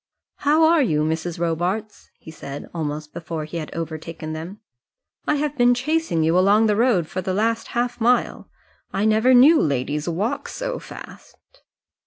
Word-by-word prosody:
"How 300 +3 +3
are 325 0 +5
you, 155 - +1
Mrs. 160 +2 -2
Robarts?" 175 +6 -2
he 160 - -12
said, 140 -3 -8
almost 150 -2 -4
before 165 -2 -5
he 155 +3 -6
had 155 -2 -6
overtaken 160 -1 -6
them. 170 +6 -7 0.7
"I 300 - +2
have 295 0 -2
been 245 -2 +4
chasing 300 - 0
you 165 +2 +2
along 205 +4 +4
the 210 -1 +2
road 225 -7 +2
for 185 +4 -5
the 185 0 -2
last 225 +2 0
half 240 0 -1
mile. 245 +2 +1 0.4
I 205 - -1
never 220 +4 +4
knew 290 +7 +7
ladies 145 +2 -1
walk 195 +8 -2
so - - -4
fast." - - -12
190 Hz, 165 wpm, -22 LUFS, 160-245 Hz, 0.7 s, knew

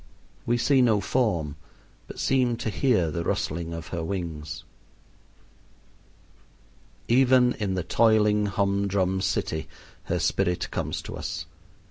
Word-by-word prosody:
We 120 +1 +2
see 135 +2 +3
no 115 -4 +4
form, 90 - 0 0.5
but - - -10
seem 125 -3 +2
to 110 - -3
hear 105 - +2
the 85 +1 -2
rustling 85 0 -2
of 80 -1 -6
her 85 -2 -3
wings. 80 -4 -5 2.4
Even 125 0 +5
in 100 -3 -1
the 90 - -1
toiling 105 -1 +3
hum 100 0 0
drum 95 -1 0
city 90 -4 -1 0.4
her - - -1
spirit 90 -2 0
comes - - -3
to - - -7
us. - - -5
100 Hz, 125 wpm, -26 LUFS, 85-115 Hz, 2.4 s, Even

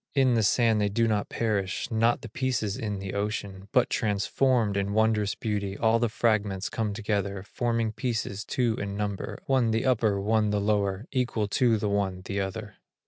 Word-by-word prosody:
In 130 -3 +4
the 115 - +3
sand 110 0 +3
they 105 - +2
do 115 +3 +1
not 105 -2 0
perish, 105 -5 -1
Not 115 +1 +2
the 115 - -7
pieces 125 -4 -1
in 105 -2 -3
the 95 0 -5
ocean; 100 -1 -3
But 125 -3 +4
transformed, 110 +2 +1
in 100 0 -1
wondrous 110 -2 +2
beauty 100 -4 -3
All 115 0 +3
the 120 -1 +1
fragments 105 -4 0
come 110 -2 -2
together 100 -2 -2
Forming 115 +1 -1
pieces 110 -3 -3
two 120 -3 0
in 100 0 -4
number, 105 -2 -3
One 130 -4 +2
the 110 +3 0
upper, 110 -6 +2
one 105 +1 +2
the 105 0 +1
lower, 100 0 0
Equal 120 -5 0
to 115 +1 +3
the 105 0 -1
one, 95 -2 -1
the 100 +1 -2
other. 100 +2 -5
105 Hz, 185 wpm, -27 LUFS, 100-115 Hz, -, In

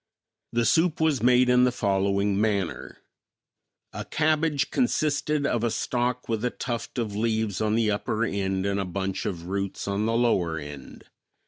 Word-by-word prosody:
The 120 0 +1
soup 165 +3 +2
was 160 -4 +2
made 125 +1 +5
in 125 0 +5
the 125 - +4
following 100 -2 +1
manner: 100 -5 -2 1.0
A - - -5
cabbage 155 -2 +1
consisted 150 - 0
of 120 -4 0
a 120 - +2
stalk 125 +2 -1
with 110 -1 -2
a 125 - +2
tuft 120 +1 -5
of 110 -4 -2
leaves 110 -2 -1
on 110 0 +1
the 110 -2 +2
upper 110 +2 -1
end 95 -2 -1
and 100 0 0
a 95 - -1
bunch 95 +1 -3
of 85 -3 -5
roots 100 +1 -3
on 100 +2 0
the 115 0 +1
lower 90 -9 +1
end. 75 -3 -9
110 Hz, 165 wpm, -26 LUFS, 100-125 Hz, 1.0 s, made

